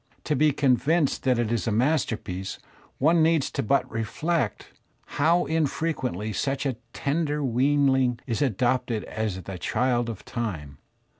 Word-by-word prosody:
To 150 - 0
be 150 +2 +4
convinced 140 +3 +2
that 130 -2 +3
it 115 -2 0
is 115 -4 -1
a - - +1
masterpiece 110 - -1 0.4
one 160 +4 +4
needs 160 -3 +2
but 140 +6 +2
to 125 - -18
reflect 120 - -2 0.3
how 165 +4 +2
infrequently 140 - -1
such 135 +7 -1
a 130 -4 -1
tender 150 +1 -1
weanling 130 0 +2
is 115 -1 -2
adopted 125 -2 0
as 105 -4 -3
the 95 +1 -7
child 120 +4 0
of 110 - -7
time. 85 - -5
130 Hz, 140 wpm, -26 LUFS, 110-145 Hz, 0.4 s, be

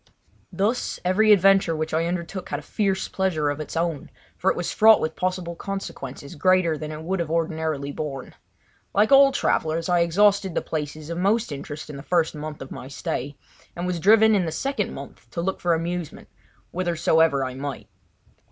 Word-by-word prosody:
Thus, 215 +6 -1
every 215 +4 +4
adventure 195 -3 +5
which 155 0 -3
I 165 +1 +1
undertook 175 +1 -4
had 145 - -2
a 150 - -9
fierce 195 +1 -1
pleasure 160 -6 0
of 145 - -5
its 155 +1 -5
own, 165 -3 -2 0.3
for - - +1
it - - 0
was - - -2
fraught 220 0 +7
with 160 0 -2
possible 180 -2 -2
consequences 145 -8 -6
greater 185 0 +3
than 155 0 -6
it 155 +1 -7
would 190 +3 -2
have 170 -2 -2
ordinarily 160 -3 -1
borne. 140 -3 -6 0.6
Like 210 +4 +3
all 275 0 +8
travellers 165 - 0
I 175 -1 +3
exhausted 195 +2 +3
the - - 0
places 155 0 -5
of 170 - -3
most 215 +2 +1
interest 145 +2 -7
in 150 -2 -8
the - - -7
first 165 +1 +1
month 150 -2 -6
of 135 - -13
my 130 - -8
stay, 140 0 -4 0.4
and 175 - -4
was 180 -1 -2
driven 220 +4 +6
in 195 -4 +2
the - - -2
second 275 - -2
month - - -10
to - - -6
look 190 +2 -2
for 175 -1 +2
amusement 170 -1 -5 0.4
whithersoever 160 -5 +2
I 130 - -5
might. 135 +1 -6
170 Hz, 190 wpm, -24 LUFS, 155-190 Hz, 0.6 s, all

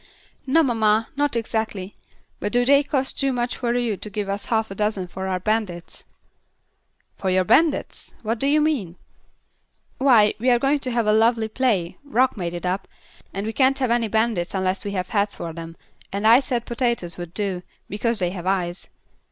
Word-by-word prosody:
"No, 320 +5 +4
mamma, 225 -4 +2
not 290 -2 0
exactly; 220 -4 -3 0.4
but 205 - -2
do 245 0 +2
they 280 +2 +6
cost 275 -2 -2
too 275 -1 +2
much 245 -1 -1
for 240 -2 -1
you 240 -4 0
to 210 - -6
give 205 0 -4
us 200 +1 -3
half 220 -2 0
a - - -3
dozen 210 -2 -1
for 190 +2 -5
our 185 -1 -1
bandits?" 200 -4 -3 1.1
"For 190 - -2
your 185 0 +3
bandits! 305 - +1
What 225 +1 -1
do 275 - +3
you 300 +2 +4
mean?" 255 - 0 1.0
"Why, 235 -6 +5
we 250 +3 +2
are 245 - +5
going 275 +4 +1
to 255 -2 -3
have 235 -1 +1
a 210 - +3
lovely 225 0 +3
play 215 -8 0
Rock 260 -2 +2
made 175 -4 -4
it 175 - -5
up 185 +2 -2 0.4
and 195 +2 -4
we 220 - -3
can't 270 +1 +3
have 255 -3 0
any 235 -1 +2
bandits 220 -5 0
unless 185 0 -1
we 200 - -4
have 185 -1 -2
heads 205 -1 0
for 165 -1 -6
them, 165 0 -8 0.3
and 200 +2 -3
I 230 +3 +8
said 250 -4 -2
potatoes 235 -8 -2
would 175 0 -8
do, 195 -3 -2 0.3
because 230 +3 -1
they 180 -2 0
have 180 -1 -6
eyes. 180 -2 -1
220 Hz, 195 wpm, -23 LUFS, 190-245 Hz, 1.1 s, I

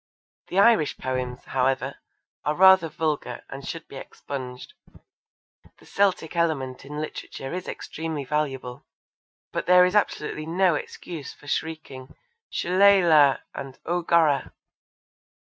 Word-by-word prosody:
The 180 - -4
Irish 200 -7 +4
poems, 125 -1 -3
however, 135 +1 -1 0.4
are 150 - 0
rather 190 -2 +6
vulgar 150 -5 -3
and 135 +1 -8
should 165 -1 -6
be 135 - -10
expunged. 130 -2 -8 1.0
The - - -20
Celtic 190 -5 0
element 145 -7 -1
in 150 +2 -7
literature 145 -2 -6
is 180 0 -5
extremely 160 -3 -5
valuable, 135 -4 -3 0.6
but - - -3
there 180 0 +7
is 180 - -1
absolutely 155 -6 0
no 180 +1 +3
excuse 155 0 -6
for - - -19
shrieking 145 -4 -5 0.3
'Shillelagh!' 175 -7 +5
and 135 -1 -7
'O 175 +1 0
Gorrah!' 165 -4 +2
155 Hz, 120 wpm, -25 LUFS, 135-175 Hz, 1.0 s, there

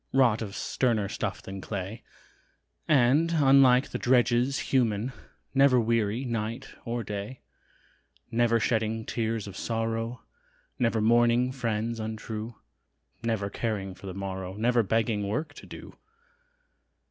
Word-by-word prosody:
Wrought 125 -5 +3
of 100 -3 -5
sterner 115 -6 0
stuff - - -4
than 95 0 -7
clay; 100 +2 -5 0.9
And, 150 +4 +4
unlike 135 -3 +5
the - - -4
drudges 125 +2 +3 0.2
human, 120 -1 +1 0.4
Never 135 -2 +5
weary 115 +1 0
night 115 +1 -4
or 120 -1 -2
day; 105 +5 -6 0.9
Never 115 0 +3
shedding 110 0 0
tears 115 -2 -2
of 100 - -8
sorrow, 115 +1 -2 0.6
Never 115 -3 +2
mourning 120 +2 +4
friends 115 -2 -2
untrue, 110 +1 -5 0.7
Never 110 -4 -1
caring 100 -5 -3
for 100 - -11
the 95 - -6
morrow, 95 -1 -5
Never 120 +3 +2
begging 110 -1 0
work 150 +11 -2
to - - -12
do. - - -10
115 Hz, 125 wpm, -28 LUFS, 105-125 Hz, 0.9 s, unlike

